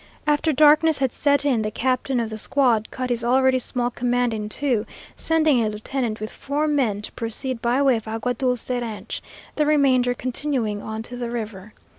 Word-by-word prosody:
After 300 +1 +2
darkness 305 +2 +5
had 265 -3 0
set 285 -1 +2
in, 255 -6 +2
the 215 - -1
captain 255 +2 0
of 225 -1 -2
the 220 - -5
squad 240 -4 +2
cut 255 -1 -4
his 235 -1 +1
already 260 +1 +3
small 245 0 -2
command 245 0 0
in 210 -1 -4
two, 245 -3 0 0.3
sending 310 -6 +2
a 215 - 0
lieutenant 220 +1 -3
with 215 +1 -6
four 290 +2 -2
men 240 -9 0
to - - -6
proceed 230 +2 -3
by 240 +3 +1
way 265 -4 +4
of 220 - -9
Agua 225 +3 -2
Dulce 250 0 -2
ranch, 235 -4 -4 0.4
the 300 - +3
remainder 260 -5 +3
continuing 245 -5 -2
on 220 0 -5
to 245 - -7
the 240 -1 -4
river. 215 -3 -6
245 Hz, 190 wpm, -23 LUFS, 225-275 Hz, 0.4 s, darkness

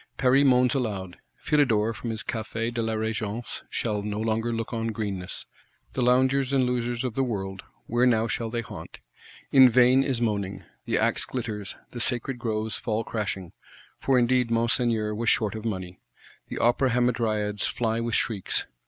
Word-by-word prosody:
Paris 135 +2 +4
moans 125 -2 +4
aloud. 100 -9 -3 0.2
Philidor, 115 -7 +2
from 115 +2 -6
his 110 0 -4
Café 115 +1 -3
de 115 - -1
la 110 0 -1
Regence, 110 +1 -3
shall 105 -3 -1
no 105 0 -3
longer 115 +1 0
look 115 +1 -3
on 115 0 -1
greenness; 100 -5 -4 0.5
the 130 - -1
loungers 130 +2 +3
and 135 -2 +3
losels 120 -1 -1
of 125 -3 -2
the 135 - +1
world, 95 -5 -3 0.2
where 120 +2 +2
now 115 -2 +3
shall 115 -1 -2
they 120 +1 -2
haunt? 110 -3 -9 0.5
In 130 -2 +8
vain 125 +2 +5
is 135 -3 0
moaning. 100 -4 -1 0.2
The - - +1
axe - - +1
glitters; 110 -5 -5 0.2
the 120 - -5
sacred 125 +2 -2
groves 110 -2 -1
fall 110 -1 -1
crashing,—for 105 +5 -3
indeed 125 0 +3
Monseigneur 115 -2 +1
was 115 +1 0
short 105 -3 +2
of 110 0 -6
money: 95 -5 -4 0.5
the - - -6
Opera 120 +3 +3
Hamadryads 110 -4 +1
fly 115 -1 -1
with 115 -1 -1
shrieks. 105 -5 -1
115 Hz, 165 wpm, -26 LUFS, 110-125 Hz, 0.5 s, In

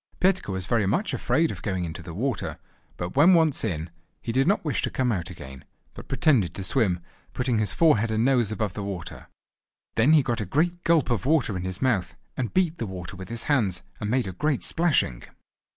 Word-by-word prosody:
Petka 190 - +2
was 95 -1 -3
very 105 +1 +1
much 190 - 0
afraid 165 0 +1
of 90 - -8
going 95 -2 -2
into 80 - -6
the 80 - -9
water, 120 +2 -2 0.4
but 85 +1 -5
when 165 +7 +7
once 160 -4 +3
in, 85 -6 -3 0.3
he - - -4
did 130 +5 +2
not 200 -2 +2
wish 145 -6 0
to - - -1
come 130 -2 0
out 90 -4 -2
again, 65 -7 -10 0.3
but - - -11
pretended 120 - +2
to 95 - -5
swim, 95 -4 +1 0.3
putting 125 -3 0
his 110 - 0
forehead 115 -9 +3
and 110 +1 +1
nose 125 -5 +3
above 110 -4 -2
the 105 - -5
water. 100 -4 -6 0.7
Then 130 +8 +4
he 150 -3 +6
got 120 -3 -1
a - - -2
great 170 - 0
gulp 165 -6 +3
of 115 0 -1
water 145 -9 +2
in 90 - -3
his 95 +5 -4
mouth, 110 -9 0 0.2
and 120 -3 -2
beat 175 -3 +1
the 115 - -2
water 95 -1 -7
with 95 +1 -9
his 115 -1 -3
hands 105 - +1 0.2
and 105 - -3
made 125 +2 +1
a 95 - -4
great 145 - -1
splashing. 155 - +1
115 Hz, 215 wpm, -25 LUFS, 95-145 Hz, 0.7 s, when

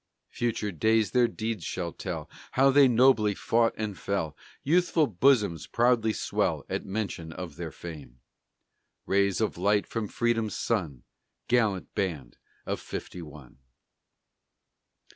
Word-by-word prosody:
Future 110 -3 -1
days 110 +3 +2
their 125 -1 +4
deeds 110 -5 -4
shall 85 0 -4
tell, - - -5 0.3
How 135 +1 +5
they 140 0 +7
nobly 115 -4 +4
fought 115 0 +1
and 105 -2 -3
fell, 85 -7 -2 0.3
Youthful 170 +1 +3
bosoms 105 - +2
proudly 120 -2 +2
swell - - -1
At - - -2
mention 95 -5 -4
of 85 -3 -7
their - - -5
fame 70 -8 -10 0.9
Rays 100 -1 +2
of 110 -5 -1
light 100 +2 +2
from 115 -2 -3
Freedom's 115 -1 0
sun, 85 - -2 0.4
Gallant 110 -6 +1
band 80 - -3 0.3
of - - -2
Fifty 90 - -7
one! 75 -5 -12
105 Hz, 125 wpm, -28 LUFS, 85-115 Hz, 0.9 s, they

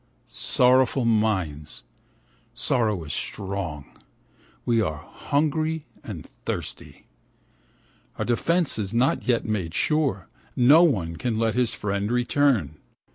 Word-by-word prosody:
Sorrowful 130 0 +3
minds, 95 -10 0 0.7
sorrow 110 -8 +1
is 75 - -5
strong, 95 -7 -4 0.8
we 115 -2 +2
are 80 -5 -3
hungry 155 +2 -1 0.2
and - - -7 0.2
thirsty. - - -6 1.1
Our - - -2
defence 165 +4 +1
is 105 +1 -3
not 125 +2 +1
yet 120 -2 +1
made 95 -6 -3
sure, 140 - 0 0.3
no 140 +7 +6
one 95 - +1
can 115 +6 -2
let 110 -1 +1
his 120 -2 0
friend 100 +1 -2
return. 125 - +1
115 Hz, 110 wpm, -24 LUFS, 95-130 Hz, 1.1 s, no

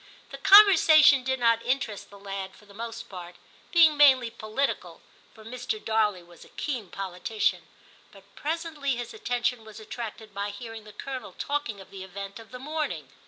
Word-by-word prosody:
* - - -27
The - - -8
conversation 320 -9 +7
did 260 0 -1
not 230 -1 +3
interest 240 -4 -2
the 200 - -14
lad 195 -1 -6
for 210 - -19
the 205 - -17
most 230 +2 -7
part, 180 -2 -10 0.4
being 325 -3 +6
mainly 260 -5 +5
political 220 +6 -3 0.4
(for 220 -1 -15
Mr. 250 - -4
Darley 215 - 0
was 175 -1 -16
a - - -17
keen 245 - -4
politician); 195 +3 -2 0.4
but 195 -1 -16
presently 310 -3 -2
his 240 0 -6
attention 245 - -2
was 220 0 -12
attracted 220 -1 -8
by 200 +1 -3
hearing 225 +1 -9
the 210 - -12
Colonel 265 -2 -7
talking 285 -8 -3
of 190 - -14
the 195 -1 -8
event 195 +2 -8
of 225 -2 -14
the 250 - -8
morning. 270 - -4
230 Hz, 175 wpm, -27 LUFS, 200-275 Hz, 0.4 s, conversation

